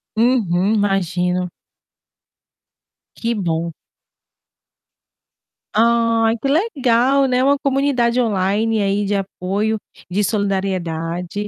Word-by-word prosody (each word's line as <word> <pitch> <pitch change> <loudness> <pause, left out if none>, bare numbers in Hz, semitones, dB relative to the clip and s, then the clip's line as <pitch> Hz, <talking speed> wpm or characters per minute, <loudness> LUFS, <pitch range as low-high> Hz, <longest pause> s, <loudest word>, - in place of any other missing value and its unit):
Uhum, 215 -5 +2
imagino. 180 -3 0 1.7
Que 235 0 -2
bom. 170 -3 -2 2.0
Ai, 230 0 +3
que 275 - -2
legal, 275 - +2
né, 255 0 +1
uma 280 +1 +3
comunidade 265 -3 +1
online 215 +1 0
aí 200 0 0
de 205 +1 0
apoio, 200 +3 -2 0.3
de 200 +3 -1
solidariedade, 190 -2 -2
210 Hz, 85 wpm, -19 LUFS, 185-235 Hz, 2.0 s, Ai